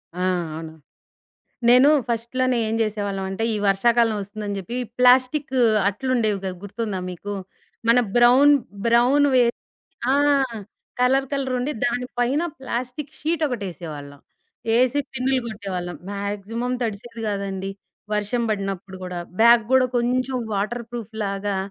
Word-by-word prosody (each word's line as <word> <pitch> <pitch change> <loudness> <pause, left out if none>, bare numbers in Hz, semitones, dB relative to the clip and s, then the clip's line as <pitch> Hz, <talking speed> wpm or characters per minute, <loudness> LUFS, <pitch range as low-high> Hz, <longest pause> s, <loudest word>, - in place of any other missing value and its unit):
ఆ! - - -6 0.4
అవును. 160 0 -7 1.0
నేను 255 +4 +7 0.2
ఫస్ట్‌లోనే 245 +2 0
ఏం 220 - -1
జేసేవాళ్ళమంటే 200 -1 -2
ఈ - - -1
వర్షాకాలం 230 +3 +3
ఒస్తుందని 205 0 -5
జెప్పి 195 +6 -6 0.2
ప్లాస్టికు 255 +2 +4 0.3
అట్లుండేవి 225 -2 0
గదా! 190 - -1
గుర్తుందా 205 -1 -4
మీకు? 205 +4 -6 0.5
మన 235 +2 +6 0.2
బ్రౌన్ 255 +5 +7 0.3
బ్రౌన్ 245 +5 +4
వే 250 - +6 0.7
ఆ! - - +4 0.9
కలర్ 265 +2 +3
కలరుండి 265 0 -1
దాని 275 -3 0
పైన 265 +6 +2 0.2
ప్లాస్టికు 255 +2 -4
షీటొకటేసేవాళ్ళం. 185 - -3 0.6
ఏసి 255 +3 +3
పిన్నులు 260 +1 +1
గొట్టేవాళ్ళం 185 -5 -5
మాక్సిమం 205 +5 -3
తడిసేది 225 +1 -5
గాదండి. 195 -1 -3 0.4
వర్షం 210 +4 0
బడినప్పుడు 195 -2 -3
గూడా 180 -1 -5 0.2
బ్యాగ్ 235 0 +7
గూడా 260 -1 +5
కొంచెం 255 +2 0 0.2
వాటర్ 215 +4 -2
ప్రూఫ్‌లాగా 205 -3 -3
230 Hz, 110 wpm, -23 LUFS, 200-255 Hz, 1.0 s, నేను